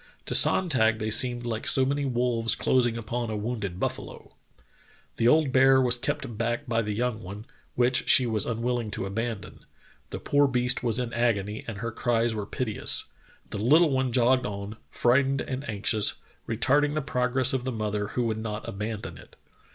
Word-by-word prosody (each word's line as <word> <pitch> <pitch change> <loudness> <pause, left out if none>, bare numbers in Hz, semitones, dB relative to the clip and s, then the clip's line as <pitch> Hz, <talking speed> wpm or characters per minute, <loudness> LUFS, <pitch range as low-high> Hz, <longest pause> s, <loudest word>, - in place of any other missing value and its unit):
To - - -3
Sonntag 120 -12 +4
they 110 0 -3
seemed 120 +1 0
like 115 -2 -4
so 130 - +4
many 140 +1 -1
wolves 120 -3 0
closing 120 -3 +1
upon 115 +1 -4
a 110 - -3
wounded 105 -4 -4
buffalo. - - -5 0.8
The 115 - +2
old 150 +1 +3
bear 130 0 +5
was 125 -1 +2
kept 125 -2 -4
back 120 +4 -2
by 115 -2 0
the 105 -2 -3
young 120 -1 -2
one, 100 +3 -9 0.3
which 125 +1 +2
she 130 - +8
was 110 -3 -1
unwilling 120 0 -2
to - - -3
abandon. 110 +1 -5 0.5
The - - -5
poor 145 0 +2
beast 125 -1 +1
was 115 -2 +1
in 125 -2 -3
agony 110 -3 -1
and 115 -3 -6
her 115 +3 -4
cries 115 0 0
were 105 -2 -5
piteous. 110 -3 -1 0.4
The 105 - -4
little 150 +8 +4
one 130 -1 0
jogged 125 +2 +2
on, 100 +1 -7
frightened 135 +2 +2
and 135 0 -5
anxious, 105 0 0 0.3
retarding 145 +6 +1
the 155 - -1
progress 130 -1 +1
of 130 -2 -1
the 130 - -3
mother 105 -2 -3
who 125 - -2
would 110 -2 -2
not 105 -1 -5
abandon 105 +1 -6
it. - - -17
120 Hz, 180 wpm, -26 LUFS, 110-130 Hz, 0.8 s, she